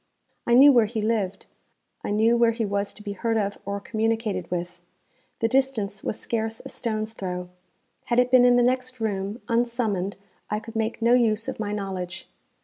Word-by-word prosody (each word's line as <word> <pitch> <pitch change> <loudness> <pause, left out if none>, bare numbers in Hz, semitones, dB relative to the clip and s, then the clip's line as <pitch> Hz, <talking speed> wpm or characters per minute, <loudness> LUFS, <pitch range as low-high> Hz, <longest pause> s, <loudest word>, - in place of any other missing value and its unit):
I 240 - +5
knew 280 +3 +9
where 235 -5 +4
he 225 +1 -3
lived; 210 -3 -1 0.6
I - - -3
knew 220 +3 +3
where 235 -1 +4
he 225 -1 -1
was 200 0 -1
to 210 - -12
be 205 - -4
heard 225 +3 -1
of 200 -1 -1
or 200 0 -3
communicated 220 -4 -1
with. 175 0 -4 0.6
The 225 - +3
distance 230 -6 0
was - - -3
scarce 225 -1 -2
a - - -9
stone's 220 -1 -3
throw. 180 -3 -5 0.6
Had 240 - 0
it 250 0 +3
been 255 -1 +7
in 245 0 +6
the 245 - +4
next 255 0 0
room, 205 0 -2
unsummoned 230 -5 0 0.3
I 210 - -1
could 225 +1 -11
make 225 +1 -2
no 235 +1 +5
use 225 -3 +2
of - - -4
my 210 -1 -2
knowledge. 190 -3 -5
220 Hz, 190 wpm, -25 LUFS, 200-235 Hz, 0.6 s, knew